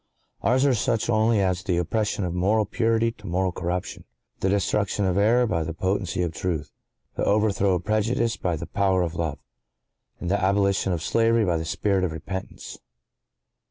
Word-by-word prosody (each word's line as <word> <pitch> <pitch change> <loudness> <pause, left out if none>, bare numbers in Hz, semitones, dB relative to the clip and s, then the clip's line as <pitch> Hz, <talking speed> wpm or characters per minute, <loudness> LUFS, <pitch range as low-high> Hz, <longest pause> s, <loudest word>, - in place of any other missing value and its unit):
Ours 130 +3 +3
are 140 - +4
such 115 0 0
only 110 0 +3
as 90 -1 0
the 90 -4 0
opposition 105 +3 -1
of 85 - -3
moral 105 +5 +2
purity 115 +2 +1
to 105 -2 -13
moral 90 +1 0
corruption—the 90 +2 -5
destruction 100 0 0
of 90 -2 +1
error 115 +5 +4
by 85 -8 0
the 80 +1 -5
potency 95 -1 -1
of 85 -2 -2
truth—the 80 -5 -6
overthrow 100 -2 +2
of 90 - -3
prejudice 115 +2 +1
by 90 -2 -1
the 75 - -5
power 95 -2 +1
of 85 -2 -3
love—and 80 +2 -8
the 100 - +1
abolition 100 0 +2
of 85 -3 -2
slavery 115 +1 +2
by 85 -3 +1
the 80 - -4
spirit 95 +3 0
of 85 -3 -1
repentance. 95 +4 -7
95 Hz, 165 wpm, -25 LUFS, 90-110 Hz, -, are